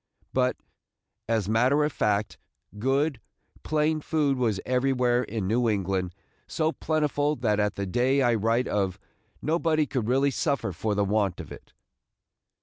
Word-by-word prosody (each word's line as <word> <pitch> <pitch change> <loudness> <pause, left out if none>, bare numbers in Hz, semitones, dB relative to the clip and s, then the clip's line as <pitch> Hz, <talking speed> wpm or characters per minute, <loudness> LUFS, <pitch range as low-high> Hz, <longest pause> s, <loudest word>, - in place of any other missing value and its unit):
But, 125 -1 +1 0.7
as 110 -4 +1
matter 125 +7 +3
of 150 -1 -1
fact, 105 0 0 0.4
good, 135 +4 0 0.4
plain 155 0 0
food 150 -3 +1
was 115 -6 0
everywhere 125 -1 +2
in 110 -4 -3
New 115 +3 +2
England 95 -3 -1 0.3
so 160 0 0
plentiful 150 -2 0
that 110 -5 0
at 105 -1 0
the 100 - -3
day 130 +8 +2
I 120 -1 +3
write 115 +3 +1
of 95 -3 -1 0.5
nobody 160 -1 +1
could 125 -5 -2
really 135 +3 +2
suffer 140 -6 -1
for 105 +5 -2
the 100 0 +1
want 100 -2 0
of - - -8
it. - - -12
125 Hz, 145 wpm, -26 LUFS, 105-140 Hz, 0.7 s, matter